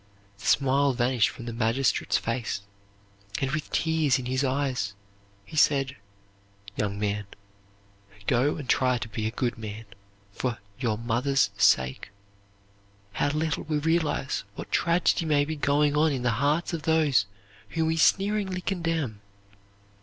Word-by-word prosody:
The - - -6
smile 140 0 +3
vanished 120 -1 +2
from 120 -2 -9
the 120 - -5
magistrate's 115 +3 +1
face 115 -4 -3 0.8
and, 135 0 -1
with 155 0 -3
tears 160 -4 +2
in 130 - -5
his 130 +2 0
eyes, 130 -7 -1 0.5
he 130 - -11
said, 140 -3 +3 0.8
"Young 100 -1 -2
man, 105 0 -2 1.0
go 130 +6 +2
and 145 -4 -7
try 125 -1 +3
to 120 - -5
be 110 0 -3
a - - 0
good 120 +1 -2
man, 110 0 -7 0.5
for 120 +2 -3 0.2
your 115 -5 0
mother's 120 0 +1
sake." 65 -7 +2 1.0
How 140 - +1
little 155 +1 -1
we 155 -1 0
realize 155 -3 0
what - - -8
tragedy 170 0 +2
may 145 -2 +3
be 160 +1 -3
going 145 0 +2
on 155 +1 +3
in 130 -3 -2
the 120 - +2
hearts 150 +5 +1
of 165 - -2
those 150 -9 +3 0.4
whom 160 +8 0
we 160 0 0
sneeringly 195 +1 +2
condemn! 165 - -2
135 Hz, 145 wpm, -27 LUFS, 115-155 Hz, 1.0 s, smile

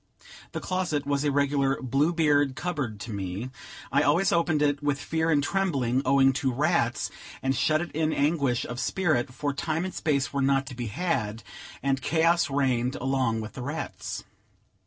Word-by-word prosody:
The - - -2
closet 180 -6 -1
was 140 0 0
a 145 - +2
regular 140 -1 +1
Blue 135 +5 +1
Beard 145 -5 +2
cupboard 145 - -3
to 115 - -6
me; 100 +5 -4 0.4
I - - +4
always 170 +7 +3
opened 165 -3 +2
it 145 0 +1
with 145 -1 0
fear 160 +2 -1
and 145 -3 +3
trembling, 140 -9 +1
owing 135 0 +5
to 135 - +1
rats, 140 -2 +1 0.3
and 135 0 +1
shut 155 +6 +2
it 175 - -5
in 155 0 0
anguish 140 -5 +1
of 120 +1 -5
spirit; 155 -10 0
for 145 +2 -2
time 160 +4 -1
and 185 - -5
space 140 -4 0
were 140 - 0
not 135 0 +2
to 130 - -8
be 120 -1 -4
had, 115 - -2 0.4
and 135 -1 +1
chaos 165 +4 +2
reigned 130 -2 +1
along 130 -4 0
with 110 -1 -7
the - - -7
rats. 145 +6 -5
140 Hz, 180 wpm, -27 LUFS, 130-155 Hz, 0.4 s, owing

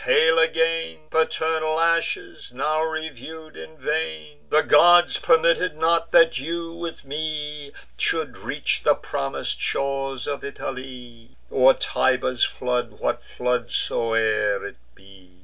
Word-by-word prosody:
hail 160 +1 +4
again, 165 0 +1
Paternal 160 0 0
ashes, 170 - -1
now 150 +5 -1
review'd 160 0 -6
in 80 0 -11
vain! 80 -2 -3
The 155 - +3
gods 175 +4 +5
permitted 165 0 +2
not, 165 +1 +1
that 165 -4 +5
you, 165 +3 -4
with 170 -3 -7
me, 150 0 -4 0.3
Should - - -1
reach - - -2
the - - +4
promis'd 70 0 -4
shores 135 -2 -2
of 140 -1 -4
Italy, 130 -3 -8
Or 130 0 +5
Tiber's 130 -1 0
flood, 125 -1 -1
what - - -2
flood 125 -1 -2
soe'er 110 -3 0
it 100 - -8 0.2
be." 95 -2 -19
145 Hz, 120 wpm, -23 LUFS, 125-160 Hz, 0.3 s, gods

